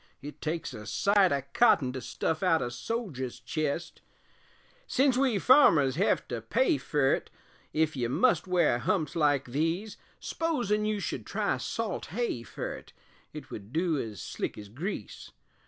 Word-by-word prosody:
it 145 +1 -9
takes 160 -2 -3
a 105 -2 -8
sight 200 - +3
o' 140 -1 0
cotton 140 - +4
To 130 - -5
stuff 155 +6 -2
out 180 -4 +3
a 120 - -3
soger's 130 - -4
chest; 155 +6 -3 0.9
Sence 265 -1 +3
we 255 -4 +2
farmers 175 - +6
hev 195 +6 +1
to - - -3
pay 360 -12 +2
fer't, 145 -3 +1 0.4
Ef 155 -1 +1
you 120 -3 -1
must 245 - +2
wear 175 -9 +3
humps 155 - 0
like 145 -4 +2
these 165 - -1 0.2
S'posin' 240 -11 -1
you 215 -1 0
should - - -4
try - - 0
salt 225 -5 -3
hay 235 - -2
fer't, 115 - -7 0.4
It - - -9
would 100 +1 -8
du 165 -1 +1
ez 110 -6 -5
slick - - -4
ez 105 -1 -9
grease. 160 - -6
160 Hz, 155 wpm, -29 LUFS, 130-210 Hz, 0.9 s, farmers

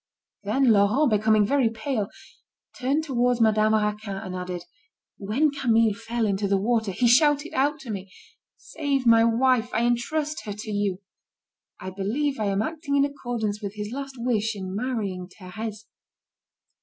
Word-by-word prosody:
Then 235 +5 +3
Laurent, 220 +7 +3
becoming 215 0 +3
very 265 +1 +2
pale, 225 -2 -3 0.7
turned 275 +5 0
towards 245 -4 +1
Madame 215 -1 +3
Raquin, 210 -1 -1
and 185 -1 -6
added: 180 -1 -5 0.5
"When 240 +10 +1
Camille 230 -6 +2
fell 230 +2 -2
into 200 0 0
the 195 0 +2
water, 220 0 0
he 240 +6 +1
shouted 290 +5 +4
out 290 +3 +1
to 245 -5 -7
me: 195 -2 -6 0.5
'Save 280 -4 -2
my 230 -1 +6
wife, 240 +1 +2
I 230 +2 +2
entrust 295 +6 -1
her 205 - -4
to 215 +1 -7
you.' 200 -2 -1 0.8
I 185 - -6
believe 235 +9 -2
I 215 - 0
am 200 +1 +1
acting 310 0 -3
in 280 - +4
accordance 240 -7 -3
with 200 0 -5
his 210 0 -5
last 275 0 -6
wish 225 -2 0
in 190 -2 -6
marrying 205 -6 -3
Thérèse." 215 +3 -7
225 Hz, 155 wpm, -25 LUFS, 205-260 Hz, 0.8 s, my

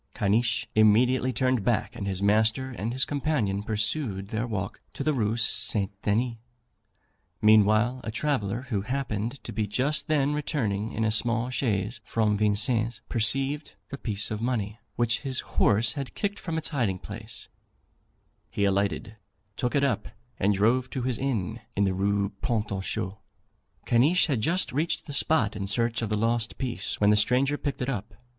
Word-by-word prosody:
Caniche 115 +5 +1
immediately 120 +4 +4
turned 130 -2 +1
back, 115 +1 0
and 100 -4 -4
his 95 0 -2
master 110 +5 +2
and 115 -1 -3
his 130 +1 +1
companion 135 -9 0
pursued 105 -1 -1
their 110 +3 -2
walk 100 -4 -4
to - - -3
the 155 - +2
Rue 110 -3 0
St. 105 -3 0
Denis. 115 +3 0 1.0
Meanwhile 110 +4 +4
a - - -4
traveller, 115 -3 -1
who 105 -6 0
happened 120 -2 -2
to - - -6
be 105 0 -1
just 130 +9 0
then 145 -2 +2
returning 115 -8 -1
in 110 - -2
a 110 - +2
small 120 +2 +1
chaise 115 -3 -1
from 110 -2 +1
Vincennes, 110 +2 +1
perceived 135 +5 0
the 140 - -6
piece 105 -2 -1
of 110 0 -3
money, 115 -3 -2 0.2
which 120 0 +2
his 135 -2 -1
horse 110 +2 +2
had 140 -3 -6
kicked 205 0 -2
from 165 -2 -3
its 160 - -2
hiding 115 - 0
place; 110 +4 -9 1.0
he 100 - 0
alighted, 100 +2 0 0.4
took 125 +4 -1
it 140 - +3
up, 130 -7 0 0.3
and 100 +1 +3
drove 120 +6 +2
to 130 - -3
his 125 -2 -1
inn, 115 -5 -2 0.2
in 100 - +2
the 95 -1 +2
Rue 100 +1 +1
Pont 110 -4 -1
aux 95 -1 -2
Choux. 95 +1 -3 0.7
Caniche 140 +10 +4
had 135 -9 0
just 175 - +1
reached 155 +5 0
the 145 - -6
spot 135 -7 +3
in 100 -2 -3
search 115 +3 0
of 115 - -2
the 105 - 0
lost 115 +1 0
piece 130 -3 -3
when 105 0 +5
the - - +5
stranger 125 +7 +3
picked 140 -3 -3
it - - -3
up. 110 -3 -4
115 Hz, 175 wpm, -27 LUFS, 105-130 Hz, 1.0 s, when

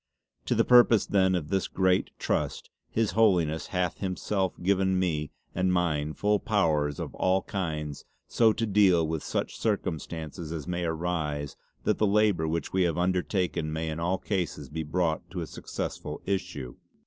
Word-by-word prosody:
To - - +1
the - - +3
purpose 120 -3 +6
then 95 -2 +3
of 75 -4 -3
this 95 -1 0
great 95 -1 +2
Trust - - -2 0.2
His 110 -2 0
Holiness 90 -8 +2
hath 90 -2 -1
himself 95 0 -2
given 95 0 +2
to - - +2
me 80 -5 0 0.2
and 95 0 +1
mine 80 -4 0
full 105 +3 +1
powers 75 -10 +1
of - - -5
all 95 +1 +1
kinds 75 -6 -4 0.2
so 115 -2 +4
to 115 - -1
deal 95 -6 +4
with 80 -1 -2
such - - -3
circumstances 80 0 -3
as 80 -2 -5
may 90 -1 -2
arise 80 -4 -2 0.3
that - - +1
the 105 - +3
labour 100 -5 +3
which 80 +1 -2
we 95 - +2
have 85 -3 +1
undertaken 90 -2 0
may 80 +1 -2
in 80 - -4
all 90 +3 0
cases 95 -5 -3
be 80 +1 -4
brought 80 +1 -1
to 90 -1 -4
a - - -3
successful - - -5
issue. 90 -10 -3
90 Hz, 170 wpm, -28 LUFS, 80-95 Hz, 0.3 s, purpose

